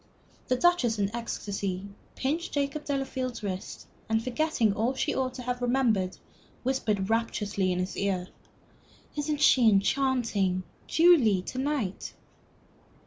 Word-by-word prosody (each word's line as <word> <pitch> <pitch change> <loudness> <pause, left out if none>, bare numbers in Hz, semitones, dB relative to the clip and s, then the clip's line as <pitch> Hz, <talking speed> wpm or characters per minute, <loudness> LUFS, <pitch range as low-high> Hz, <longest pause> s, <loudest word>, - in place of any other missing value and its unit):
The 255 - +2
Duchess 255 -7 +3
in 200 +2 -1
ecstasy 200 -5 -3 0.3
pinched 310 +6 -2
Jacob 285 +1 -1
Delafield's 260 -4 -3
wrist, 190 -2 -5 0.2
and 225 0 +1
forgetting 255 -4 +1
all 230 +5 0
that 265 - -9
she - - +1
ought 260 -1 -1
to 250 - -6
have 250 0 -3
remembered, 240 -7 +1 0.5
whispered, 215 -7 0
rapturously, 210 -4 0
in 180 - -1
his 185 +1 -2
ear, 190 -2 -1 0.9
"Isn't 295 0 -2
she 245 -6 +6
enchanting 205 -4 +1 0.2
Julie 275 - +5
to 255 - -5
night?" 265 -9 -2
240 Hz, 130 wpm, -28 LUFS, 200-270 Hz, 0.9 s, she